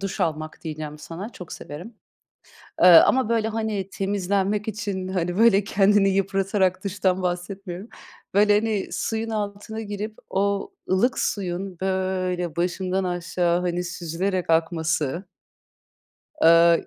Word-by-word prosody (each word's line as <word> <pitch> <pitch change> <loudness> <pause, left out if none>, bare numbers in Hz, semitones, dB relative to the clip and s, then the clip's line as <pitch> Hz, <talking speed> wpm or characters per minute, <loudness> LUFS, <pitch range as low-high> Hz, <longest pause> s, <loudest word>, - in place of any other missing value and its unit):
duş 195 -1 -4
almak 155 -1 -2
diyeceğim 155 -1 -6
sana, 170 +7 -7
çok 180 - -10
severim. 175 +11 -8 0.9
Eee, - - +8
ama 210 +8 +7
böyle 225 -1 +1
hani 220 -3 -2
temizlenmek 200 +1 -1
için, 200 -3 -3
hani 180 -1 -2
böyle 215 -3 +5
kendini 200 0 +3
yıpratarak 195 -1 +1
duştan 190 -1 0
bahsetmiyorum. 180 +2 -4 0.4
Böyle 205 +1 +5
hani 210 -2 0
suyun 225 0 -2
altına 210 +1 -4
girip 210 +1 -5
o 200 +1 0 0.2
ılık 230 +7 +2
suyun 185 -2 -2
böyle 185 -3 -1
başımdan 185 +2 -1
aşağı, 175 -1 0
hani, 180 0 -1
süzülerek 180 +1 -3
akması 160 0 0 1.2
Eee, 170 0 +6
190 Hz, 115 wpm, -24 LUFS, 175-205 Hz, 1.2 s, Eee